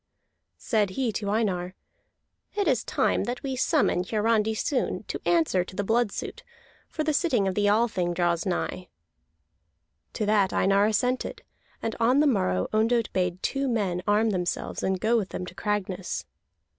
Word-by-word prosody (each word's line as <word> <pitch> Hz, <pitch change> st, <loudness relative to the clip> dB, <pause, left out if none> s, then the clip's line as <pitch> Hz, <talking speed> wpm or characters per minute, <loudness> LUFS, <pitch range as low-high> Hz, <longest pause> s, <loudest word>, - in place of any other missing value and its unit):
Said 215 Hz, -5 st, +1 dB
he 240 Hz, +4 st, -1 dB
to 205 Hz, -1 st, -3 dB
Einar: 190 Hz, -4 st, -1 dB, 0.8 s
"It 405 Hz, -3 st, 0 dB
is 255 Hz, -6 st, +2 dB
time -, -, +1 dB
that 245 Hz, +1 st, -4 dB
we 270 Hz, -2 st, -2 dB
summon 260 Hz, -, +2 dB
Hiarandi 220 Hz, +2 st, +1 dB
soon 255 Hz, +4 st, -1 dB
to -, -, -5 dB
answer 320 Hz, -, +3 dB
to 185 Hz, -, -12 dB
the 205 Hz, -, -1 dB
blood 225 Hz, +1 st, +1 dB
suit, -, -, -6 dB, 0.5 s
for 310 Hz, -, -3 dB
the 305 Hz, 0 st, +1 dB
sitting 260 Hz, -, +2 dB
of 190 Hz, -, 0 dB
the 205 Hz, +1 st, +1 dB
Althing 205 Hz, -5 st, +1 dB
draws 170 Hz, -1 st, +1 dB
nigh." 185 Hz, -1 st, -3 dB, 1.3 s
To 215 Hz, -, -2 dB
that 205 Hz, -2 st, +2 dB
Einar 200 Hz, +1 st, +3 dB
assented, 250 Hz, +4 st, -1 dB, 0.4 s
and 225 Hz, -, -2 dB
on 245 Hz, +4 st, +4 dB
the 300 Hz, -, +4 dB
morrow 90 Hz, -, +1 dB
Ondott 225 Hz, +1 st, +1 dB
bade 180 Hz, -1 st, -1 dB
two 275 Hz, 0 st, 0 dB
men 195 Hz, -7 st, 0 dB
arm 215 Hz, +2 st, +3 dB
themselves 180 Hz, -2 st, -2 dB
and 190 Hz, -1 st, 0 dB
go 230 Hz, +5 st, +2 dB
with 200 Hz, -4 st, -2 dB
them 180 Hz, -, -5 dB
to 180 Hz, -, -9 dB
Cragness. 195 Hz, -2 st, -3 dB
210 Hz, 165 wpm, -26 LUFS, 185-240 Hz, 1.3 s, on